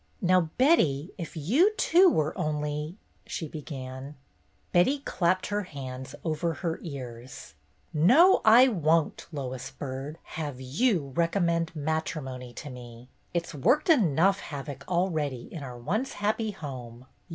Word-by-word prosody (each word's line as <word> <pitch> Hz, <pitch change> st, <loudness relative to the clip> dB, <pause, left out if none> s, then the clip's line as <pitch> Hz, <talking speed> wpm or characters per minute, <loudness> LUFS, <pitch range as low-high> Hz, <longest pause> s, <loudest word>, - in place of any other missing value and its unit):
"Now, 180 Hz, -2 st, +3 dB
Betty, 170 Hz, -, +3 dB
if 165 Hz, -1 st, -6 dB
you 280 Hz, -, +3 dB
too 360 Hz, +3 st, +6 dB
were 155 Hz, -, 0 dB
only 150 Hz, 0 st, -2 dB
— -, -, -39 dB
" -, -, -31 dB
she 160 Hz, -, -4 dB
began. 135 Hz, -2 st, -7 dB, 0.6 s
Betty 180 Hz, +12 st, +4 dB
clapped 185 Hz, -9 st, 0 dB
her 205 Hz, -, +1 dB
hands 130 Hz, -7 st, -7 dB
over 160 Hz, 0 st, -1 dB
her 165 Hz, -3 st, -3 dB
ears. 125 Hz, -, -8 dB, 0.2 s
" -, -, -41 dB, 0.2 s
No, 250 Hz, -, +6 dB
I 235 Hz, +4 st, +8 dB
won't, 165 Hz, -, +1 dB
Lois 130 Hz, -4 st, -5 dB
Byrd, 140 Hz, +2 st, -6 dB
have 145 Hz, -5 st, -6 dB
you 145 Hz, -, 0 dB
recom 170 Hz, +3 st, +1 dB
mend 170 Hz, 0 st, 0 dB
matrimony 145 Hz, -5 st, -3 dB
to 145 Hz, -, -8 dB
me. 120 Hz, 0 st, -11 dB, 0.3 s
It 170 Hz, -1 st, +1 dB
's -, -, -10 dB
worked 260 Hz, -, +2 dB
enough 195 Hz, -, +4 dB
havoc 140 Hz, -2 st, -7 dB
already 160 Hz, -8 st, 0 dB
in 165 Hz, -, -6 dB
our 125 Hz, -3 st, -7 dB
once 205 Hz, -, -2 dB
happy 215 Hz, +2 st, -1 dB
home. 130 Hz, -, -8 dB
155 Hz, 145 wpm, -28 LUFS, 135-185 Hz, 0.6 s, I